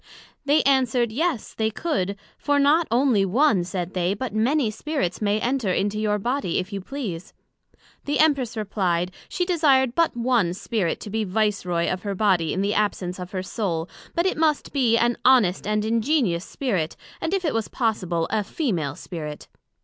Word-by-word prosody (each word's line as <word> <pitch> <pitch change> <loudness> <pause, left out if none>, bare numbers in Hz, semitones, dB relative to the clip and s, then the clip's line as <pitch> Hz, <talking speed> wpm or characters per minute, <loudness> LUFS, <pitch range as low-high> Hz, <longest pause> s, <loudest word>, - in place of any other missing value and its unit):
They 290 +2 +4
answered, 255 -4 +2
Yes, 295 - -1
they 220 0 0
could; 220 - -2 0.2
for 290 -1 0
not 295 +4 +4
onely 240 -3 +3
one, 210 0 +3
said 180 0 -4
they, 180 +1 0
but 245 0 -4
many 235 +2 +2
Spirits 220 - -3
may 210 0 +1
enter 245 -4 0
into 205 +3 0
your 210 -1 +1
body, 240 -3 -1
if 185 +3 -3
you 195 - -3
please. 195 -7 -6 0.7
The 290 0 0
Empress 275 -7 +2
replied, 185 -4 -1 0.2
she 360 - -1
desired 280 -8 +3
but 330 -4 +1
one 230 -8 +1
Spirit 195 -4 -1
to 205 - -7
be 220 +1 0
Vice 210 -1 0
Roy 170 -1 0
of 185 - -2
her 200 -1 -3
body 185 -6 +2
in 190 - -1
the 205 +1 +1
absence 190 -4 -1
of 180 0 -6
her 185 -2 -4
Soul, 180 -5 -2 0.3
but 340 - +1
it 375 - 0
must 310 -2 +1
be 245 -5 +3
an 240 +1 +1
honest 220 -9 +4
and 210 0 0
ingenious 225 - +1
Spirit; 190 - -2 0.3
and 325 - -1
if 385 -2 0
it 305 - +1
was 225 -1 -1
possible, 185 -9 -1
a 215 -1 +1
female 180 - -2
Spirit. 155 -4 -7
215 Hz, 180 wpm, -24 LUFS, 185-265 Hz, 0.7 s, They